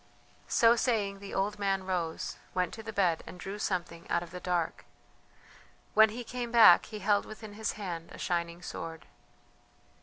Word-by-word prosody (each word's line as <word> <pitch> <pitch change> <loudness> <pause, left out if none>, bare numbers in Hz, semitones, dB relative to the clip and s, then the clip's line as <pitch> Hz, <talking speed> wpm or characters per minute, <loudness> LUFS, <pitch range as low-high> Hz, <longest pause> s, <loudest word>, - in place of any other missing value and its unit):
So 230 0 +5
saying 210 -5 0
the 200 0 -9
old 205 +2 -1
man 195 -1 0
rose, 175 -4 -2 0.2
went 180 -2 0
to 225 - -7
the 220 0 -6
bed, 180 -6 +2
and 180 - -9
drew 195 +3 -6
something 175 -4 -3
out 170 - +1
of 175 - -12
the 180 - -6
dark. 175 -3 -1 1.1
When 220 0 +7
he 240 +3 -6
came 240 0 -5
back 225 -7 +8
he 215 - -7
held 205 0 +2
within 215 -1 -10
his 220 +1 -2
hand 175 -5 -6
a - - -10
shining 170 0 -2
sword. 165 0 -6
195 Hz, 175 wpm, -30 LUFS, 175-215 Hz, 1.1 s, back